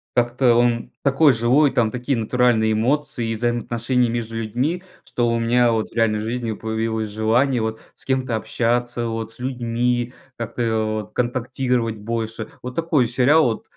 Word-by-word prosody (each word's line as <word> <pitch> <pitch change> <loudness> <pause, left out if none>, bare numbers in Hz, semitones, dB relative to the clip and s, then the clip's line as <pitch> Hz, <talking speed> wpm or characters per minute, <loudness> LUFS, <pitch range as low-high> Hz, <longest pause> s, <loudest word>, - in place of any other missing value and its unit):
как-то 120 +1 +3
он 120 -1 +1
такой 140 +1 +4
живой, 125 +5 +3
там 115 -3 +2
такие 125 +4 -2
натуральные 115 -1 +2
эмоции 120 +1 0
и 115 - -1
взаимоотношения 120 +1 0
между 115 -1 -3
людьми. 130 - -2 0.2
Что 120 -1 -1
у 115 0 +1
меня 120 +1 +3
вот 110 -1 -1
в - - -20
реальной 115 -2 +2
жизни 115 +1 -3
появилось 110 0 -2
желание 115 +4 +1
вот 110 0 -3
с - - -13
кем-то 130 -3 0
общаться, 120 +1 -1
вот 115 -1 -4
с - - -19
людьми, 120 -1 -1 0.2
как-то 115 -1 -1 0.2
вот 105 - -23
контактировать 125 -1 -1
больше. 110 +1 -4
Вот 125 0 -7
такой 165 -7 +2
сериал 125 +1 +3
120 Hz, 155 wpm, -21 LUFS, 115-125 Hz, 0.2 s, такой